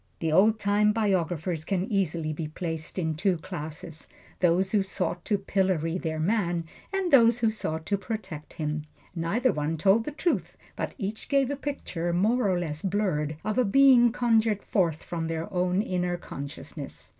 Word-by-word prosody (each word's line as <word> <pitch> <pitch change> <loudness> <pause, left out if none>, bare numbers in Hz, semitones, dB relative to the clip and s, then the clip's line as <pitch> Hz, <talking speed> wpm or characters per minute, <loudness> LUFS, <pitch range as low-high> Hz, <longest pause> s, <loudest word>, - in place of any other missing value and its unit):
The 165 -2 -1
old 210 +7 +5
time 210 0 +2
biographers 180 -6 0
can 185 +2 -1
easily 170 -7 -1
be 155 0 -4
placed 160 0 -5
in 160 -3 0
two 180 +3 +1
classes: 155 0 -7 0.3
those 185 +2 +3
who 210 - +3
sought 190 -2 -2
to 210 - +2
pillory 185 -4 0
their 160 -2 -3
man, 175 -1 +1 0.3
and 390 -2 -1
those 235 -2 +6
who 225 -2 +3
sought 160 -7 -4
to 200 -1 0
protect 190 -9 -6
him. 150 -1 -3 0.3
Neither 200 +10 +1
one 150 +2 -2
told 200 +7 +3
the - - -3
truth; 340 +4 -1 0.2
but - - -4
each 215 -2 -5
gave 275 -1 +2
a - - -1
picture, 270 - -3
more 215 +5 +2
or 185 - +2
less 155 -3 -3
blurred, 180 -7 -1
of 215 +3 0
a - - +5
being 245 +1 +6
conjured 225 -3 +2
forth 170 -6 0
from 165 -2 -3
their 165 +4 -4
own 180 +2 +1
inner 180 -3 -1
consciousness. 140 -4 -8
185 Hz, 170 wpm, -27 LUFS, 165-215 Hz, 0.3 s, those